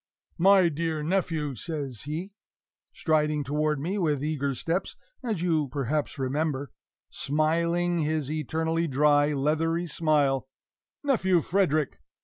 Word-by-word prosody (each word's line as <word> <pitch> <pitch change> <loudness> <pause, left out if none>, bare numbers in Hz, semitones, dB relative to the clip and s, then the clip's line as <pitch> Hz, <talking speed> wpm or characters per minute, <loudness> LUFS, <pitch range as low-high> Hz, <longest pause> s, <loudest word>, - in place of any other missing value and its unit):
"My 190 0 +6
dear 160 -1 -2
nephew!" 160 -4 0
says 140 -3 -5
he, 165 +7 -4 0.6
striding 150 -2 +1
toward 150 +2 0
me 185 +8 -2
with 150 -6 0
eager 140 -3 -1
steps, 165 +8 -2 0.3
as 215 -8 -2
you 160 -4 +1
perhaps 140 +3 -2
remember, 140 0 -1 0.4
smiling 170 +4 +1
his 155 -2 -1
eternally 160 +2 -1
dry, 145 +1 +3
leathery 160 +4 0
smile 145 -5 +1 0.6
"Nephew 190 -11 +3
Frederick!" 155 -5 +1
155 Hz, 115 wpm, -27 LUFS, 145-170 Hz, 0.6 s, My